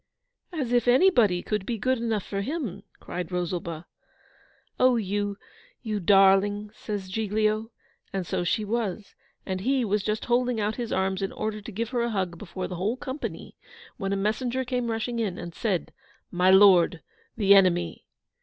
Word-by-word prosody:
'As 280 -9 -3
if 245 -1 +2
anybody 245 - +4
could 210 -2 -2
be 230 +3 -3
good 255 +3 0
enough 225 -4 -1
for 200 -1 -3
HIM,' 230 - -4 0.2
cried 180 -1 -6
Rosalba. 175 -2 -3 0.9
'Oh, 255 -1 +5
you, 205 -2 -1 0.5
you 215 -3 -2
darling!' 200 +2 +4
says 205 -3 -5
Giglio. 215 +2 0 0.4
And 190 -2 -3
so 175 - -2
she 210 +5 0
was; 210 -2 -3 0.3
and 185 -1 -3
he 260 +2 +1
was 210 0 +1
just 215 +2 -2
holding 245 -1 +1
out 210 +1 -1
his 240 -2 -4
arms 190 0 0
in 195 - -2
order 215 -1 -4
to 220 - -8
give 225 +3 -3
her 245 -2 -1
a 235 - 0
hug 185 -6 -2
before 185 -1 -5
the 180 - -6
whole 210 +8 -1
company, 265 +2 -6 0.4
when 195 -4 -3
a - - +1
messenger 240 +6 -1
came 245 -1 -1
rushing 230 +1 -2
in, 210 -6 -2
and 170 - -7
said, 190 -2 -2 0.4
'My 180 +1 +3
Lord, 185 -5 +6 0.3
the 200 -2 +5
enemy! 180 -3 +3
210 Hz, 170 wpm, -26 LUFS, 190-235 Hz, 0.9 s, Lord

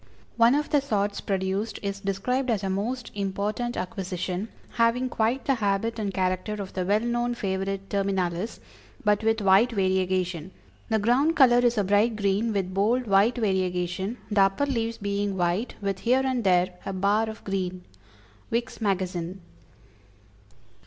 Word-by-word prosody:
One 235 +3 +5
of 295 +1 -1
the 290 - +4
sorts 205 -6 -1
produced 195 +2 -2
is 200 0 -3
described 220 +7 -1
as 215 -4 0
"a 190 - -1
most 230 +5 -3
important 205 +4 -2
acquisition, 185 +1 -3 0.2
having 240 +2 +2
quite 235 +3 0
the 275 - +3
habit 225 0 -1
and 205 -2 -1
character 185 +2 -1
of 200 -2 -6
the 185 - -1
well 200 +3 +2
known 240 +1 -1
favorite 195 -1 -3
terminalis, 195 0 -1 0.5
but 210 +1 +3
with 225 0 +2
white 200 +5 +5
variegation. 185 -3 0 0.4
The 220 - +2
ground 250 +10 +2
color 245 -5 +6
is 240 -1 +2
a 205 - +3
bright 205 +4 +2
green, 205 +2 +1
with 190 -3 -2
bold, 225 +6 +2
white 205 +3 +4
variegation, 190 0 -1
the 205 -1 +4
upper 195 +8 +3
leaves 230 -4 -2
being 200 -1 -2
white, 180 +6 0
with 195 -1 -2
here 255 +5 +2
and 255 -3 0
there 180 -1 +3
a 195 - -4
bar 205 +4 +1
of 220 - -9
green." 185 -2 -3 0.7
_Vick's 235 +1 -2
Magazine. 185 -3 -2
200 Hz, 155 wpm, -26 LUFS, 190-230 Hz, 0.7 s, color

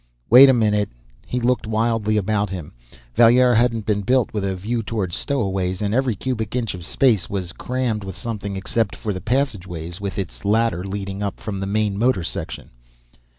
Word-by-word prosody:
"Wait 130 +3 +10
a - - +8
minute." 105 -4 +2 0.4
He 125 - -1
looked 125 -1 0
wildly 110 -1 +1
about 105 0 0
him. 90 -5 -7 0.4
Valier 120 - +6
hadn't 115 -2 +2
been 105 -1 +1
built 125 +4 +1
with 105 -2 -2
a 95 -1 -1
view 115 +6 -2
toward 105 -5 -3
stowaways; 95 - -1
and 105 0 -1
every 130 -2 +1
cubic 110 0 -3
inch 120 -4 -1
of 90 -1 -8
space 110 +1 +2
was 95 -3 -3
crammed 125 -4 -2
with 95 -2 -7
something, 100 -2 -4
except 100 +2 -1
for 105 - -3
the 95 - -6
passageway 95 - -2
with 100 -1 -4
its 95 -5 -5
ladder, 105 -3 +1
leading 100 0 -5
up 100 -2 -3
from 100 -3 -5
the 95 - -3
main 105 -1 0
motor 115 -6 +2
section. - - -5
105 Hz, 185 wpm, -22 LUFS, 95-115 Hz, 0.4 s, Wait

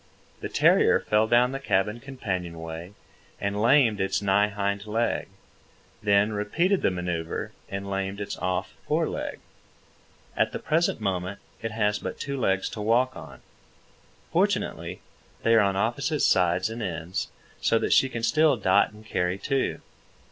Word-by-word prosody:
The - - -5
terrier - - +4
fell 105 +1 +2
down 120 +2 +4
the 135 - -4
cabin 105 -3 0
companionway 90 -9 -5 0.5
and 100 +1 -2
lamed 115 -4 +4
its 95 0 +1
nigh 100 +1 +3
hind 100 0 -2
leg, 115 +2 0 0.7
then 105 0 +3
repeated 170 - +1
the - - +3
manœuvre 90 -3 -3 0.2
and 100 0 -5
lamed 95 0 -3
its 100 0 -4
off 90 0 -2
fore - - +1
leg. - - -4 1.0
At - - +1
the - - -2
present 165 -6 0
moment 95 -1 -2 0.2
it 115 - -2
has 105 -2 0
but - - -6
two 140 -1 -3
legs 95 -5 +1
to 105 - -6
walk 120 +4 +2
on. - - -11 0.9
Fortunately, - - 0 0.4
they 115 - +4
are 115 - +7
on 100 -1 +1
opposite 130 +9 0
sides 90 +4 +3
and 115 +1 -5
ends, 90 0 -3 0.3
so 115 - +3
that - - +1
she 135 - +5
can 120 -3 -5
still 145 +4 +4
dot 100 -1 +3
and 105 +1 -15
carry 90 -3 -1
two. 135 +7 -1
105 Hz, 155 wpm, -26 LUFS, 95-115 Hz, 1.0 s, are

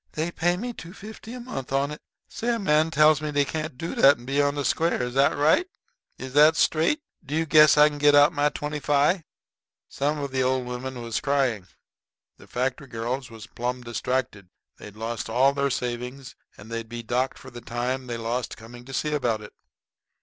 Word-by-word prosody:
"Dey 160 +2 -2
paid 175 +1 0
me 240 +5 -4
two 170 -4 -10
fifty 215 +2 -10
a - - -7
mont' 135 - -6
on 140 +2 +1
it. 150 - -8 0.3
Say, 235 +1 -2
a - - -2
man 155 -6 +2
tells 155 0 +4
me 150 -1 -3
dey 145 -1 +2
can't 155 -1 -5
do 165 +5 -4
dat 140 +1 +6
and 120 - -14
be 140 +2 +1
on 145 0 +1
de 145 -1 -2
square. 165 -5 +1
Is 125 0 -4 1.2
dat 150 +2 +6
straight? 165 - +2 0.2
Do 145 +3 -4
you 160 +1 +1
guess 155 -1 +6
I 150 0 +8
can 145 -1 -5
get 145 0 +5
out 145 +3 +6
my 145 0 +2
twenty 150 0 -4
fi'?" 150 +4 +2 0.6
Some 145 +2 -1
of 140 -2 -4
the 130 0 0
old 130 0 +1
women 125 0 -6
was 115 -1 -3
crying. 130 -9 0 0.7
The - - -16
factory 130 +3 -2
girls 125 +2 -4
was 110 -1 -10
plumb 125 +1 -4
distracted. 120 -5 -3 0.3
They'd 105 -1 -11
lost 115 0 -4
all 130 +4 +3
their 140 0 0
savings 125 +1 -4 0.2
and 110 +3 -13
they'd 115 -1 -5
be 120 0 -6
docked 125 +3 -1
for 130 - -12
the 120 0 -9
time 125 +3 -3
they 120 -1 -4
lost 115 +2 -3
coming 120 +2 -12
to 135 - -10
see 150 +3 -1
about 120 -7 0
it. 105 - -11
135 Hz, 200 wpm, -25 LUFS, 120-150 Hz, 1.2 s, I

